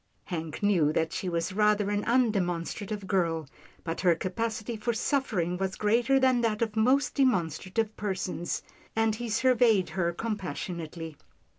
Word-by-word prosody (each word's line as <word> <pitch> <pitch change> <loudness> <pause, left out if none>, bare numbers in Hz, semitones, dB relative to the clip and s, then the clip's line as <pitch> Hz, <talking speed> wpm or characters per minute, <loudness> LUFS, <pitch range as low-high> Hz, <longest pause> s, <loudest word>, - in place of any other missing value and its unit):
Hank 165 -1 -5
knew 175 -8 +3
that 160 0 0
she 185 - -2
was 170 +2 -1
rather 210 0 +2
an 205 0 0
undemon 205 -9 +2
strative 205 +2 -5
girl, 165 -5 0 0.4
but 165 0 -3
her 175 -3 +4
capacity 220 +6 -3
for 230 +2 -1
suffering 215 - 0
was 190 0 -1
greater 235 +6 +3
than 260 -2 +3
that 225 -1 +1
of 220 -1 -3
most 255 +6 +3
demonstrative 215 - 0
persons, 185 -3 -3 0.3
and 225 0 +2
he 235 +2 -4
surveyed 225 -5 +3
her 170 +1 0
compassionately. 170 -6 -5
205 Hz, 145 wpm, -28 LUFS, 175-225 Hz, 0.4 s, her